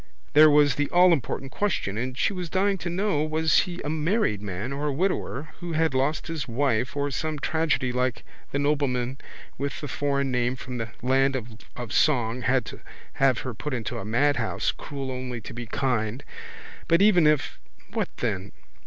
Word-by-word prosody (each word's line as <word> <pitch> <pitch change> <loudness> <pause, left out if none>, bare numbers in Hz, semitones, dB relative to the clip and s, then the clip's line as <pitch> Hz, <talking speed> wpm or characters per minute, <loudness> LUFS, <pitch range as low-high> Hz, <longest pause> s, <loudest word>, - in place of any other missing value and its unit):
There 155 +1 +8
was 145 -2 +5
the 145 +2 -1
allimportant 170 -6 +3
question 155 - -1
and 125 +3 -3
she 200 - +1
was 180 -3 -4
dying 195 +2 +1
to 175 - -3
know 185 -3 0
was 155 0 +3
he 175 0 -6
a 145 - -3
married 160 - +1
man 105 +6 -4
or 145 +2 -2
a - - +1
widower 155 -2 -1
who 175 -1 -5
had 160 -2 +2
lost 135 +4 0
his 160 -5 -4
wife 125 0 0
or 145 0 0
some 155 +3 -2
tragedy 155 -3 0
like 125 0 -1 0.3
the - - 0
nobleman 135 -3 0 0.4
with 140 0 -3
the 145 - -5
foreign 140 0 0
name 125 0 +1
from 125 -1 -6
the 115 -1 -3
land 135 +1 +3 0.4
of 120 -3 -5
song 125 -5 +2
had 125 0 +2
to - - -8 0.4
have 130 -3 +4
her 130 - -4
put 135 +4 -4
into 115 -4 -3
a - - -5
madhouse, 140 +8 +1
cruel 135 -2 -6
only 125 -1 -4
to - - -9
be 120 0 -6
kind. 125 -1 -1 0.6
But 170 +4 +5
even 180 -7 +6
if—what 150 -2 -2
then? 100 -4 -2
140 Hz, 180 wpm, -26 LUFS, 125-155 Hz, 0.6 s, There